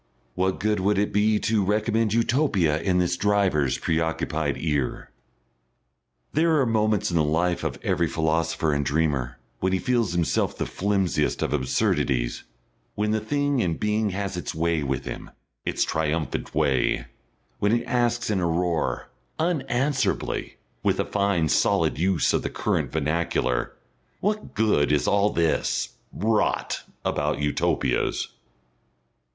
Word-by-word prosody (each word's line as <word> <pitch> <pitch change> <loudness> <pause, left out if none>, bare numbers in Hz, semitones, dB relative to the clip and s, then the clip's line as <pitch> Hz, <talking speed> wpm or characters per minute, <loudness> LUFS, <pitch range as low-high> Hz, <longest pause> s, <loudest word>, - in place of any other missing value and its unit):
What 95 +3 0
good 105 0 +1
would 100 +2 +1
it 105 +1 0
be 105 +1 +3
to 110 -2 +2
recommend 110 +2 +1
Utopia 115 - +2
in 90 -1 +1
this 90 0 +1
driver's 95 -9 +2
preoccupied 80 -2 -1
ear? 75 -5 -2 1.2
There 160 0 +3
are 135 - +3
moments 110 -4 +1
in 85 - +1
the 80 - +3
life 85 +4 0
of - - -2
every - - +1
philosopher 80 -1 0
and 70 0 0
dreamer 70 -5 0 0.2
when 95 0 0
he - - +3
feels 115 -3 0
himself 85 -2 0
the - - -1
flimsiest 95 -6 0
of - - -1
absurdities, 65 -2 0 0.5
when 105 +1 0
the 110 - +1
Thing 145 +4 0
in 85 -7 0
Being 105 0 0
has 100 0 -3
its 90 - -4
way 85 0 +1
with 70 -1 -2
him, - - -6 0.4
its - - +1
triumphant 80 0 -2
way, 65 -3 +1 0.5
when 105 - +2
it 120 +1 +1
asks 120 -2 0
in 100 - +1
a 85 - +1
roar, 85 -1 -1 0.3
unanswerably, 135 - -1 0.2
with - - +1
a - - +1
fine 100 -5 +1
solid 75 - +2
use 90 -2 +2
of - - +2
the - - -3
current - - -1
vernacular, 80 +2 0 0.5
"What 210 +2 -2
Good 105 -10 +2
is 75 -2 +2
all 100 +1 +3
this 85 -4 0 0.2
Rot 110 +2 0 0.2
about - - 0
Utopias?" 75 0 0
95 Hz, 140 wpm, -25 LUFS, 80-110 Hz, 1.2 s, be